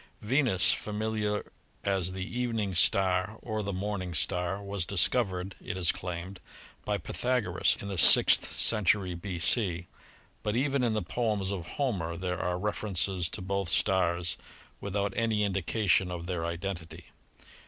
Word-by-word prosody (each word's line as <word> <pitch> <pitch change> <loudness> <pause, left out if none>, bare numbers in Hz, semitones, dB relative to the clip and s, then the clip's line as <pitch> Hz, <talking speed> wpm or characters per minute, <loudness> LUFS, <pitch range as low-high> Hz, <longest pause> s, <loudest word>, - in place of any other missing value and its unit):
Venus, 120 -5 +2
familiar 105 -1 -2 0.3
as 95 -2 0
the 95 0 -4
evening 115 -4 -2
star 95 +3 +2
or 110 -2 -3
the 100 -1 -3
morning 95 -2 -3
star, 90 +4 -1
was 100 -2 -3
discovered 95 0 +1
— - - -28
it 95 - -4
is 90 -3 +3
claimed 90 +1 -6 0.2
— - - -23
by 105 -1 0
Pythagoras 110 0 0
in 100 - -6
the 95 -3 -2
sixth - - +6
century 100 -3 +3
B.C., 90 0 0 0.6
but 105 +1 -2
even 135 +1 +1
in 115 -3 +1
the 105 - -1
poems 105 -2 -1
of 90 -4 -5
Homer 90 - -1
there 90 0 -3
are 90 0 -1
references 95 -3 -1
to 95 - -1
both 100 -1 -2
stars 90 -2 +1 0.4
without 100 0 -2
any 110 -2 +1
indication 95 -1 +1
of 85 -1 -5
their 85 -2 -3
identity. 85 -2 -6
95 Hz, 145 wpm, -29 LUFS, 90-105 Hz, 0.6 s, sixth